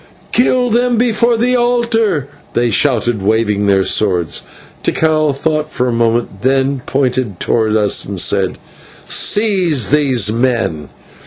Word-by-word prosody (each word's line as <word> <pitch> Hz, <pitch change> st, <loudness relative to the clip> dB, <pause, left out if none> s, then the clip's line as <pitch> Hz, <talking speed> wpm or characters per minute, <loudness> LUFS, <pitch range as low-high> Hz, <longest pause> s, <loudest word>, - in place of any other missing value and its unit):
"Kill 250 Hz, 0 st, +2 dB
them 240 Hz, +1 st, +1 dB
before 235 Hz, 0 st, +1 dB
the 250 Hz, +2 st, +1 dB
altar!" 230 Hz, -, 0 dB, 0.3 s
they 120 Hz, -1 st, 0 dB
shouted, 120 Hz, -3 st, +1 dB
waving 105 Hz, 0 st, 0 dB
their 95 Hz, -1 st, +3 dB
swords. 90 Hz, -, 0 dB, 0.4 s
Tikal 155 Hz, -2 st, +1 dB
thought 155 Hz, +2 st, -2 dB
for 125 Hz, -, -1 dB
a -, -, -1 dB
moment, 115 Hz, -3 st, -1 dB
then 135 Hz, +1 st, 0 dB
pointed 130 Hz, -7 st, -1 dB
towards 110 Hz, -2 st, 0 dB
us 105 Hz, -2 st, +2 dB
and 100 Hz, -2 st, -5 dB
said, 95 Hz, 0 st, 0 dB, 0.5 s
"Seize 185 Hz, -, +1 dB
those 130 Hz, -8 st, +2 dB
men." 115 Hz, -, -1 dB
130 Hz, 130 wpm, -14 LUFS, -, 0.5 s, their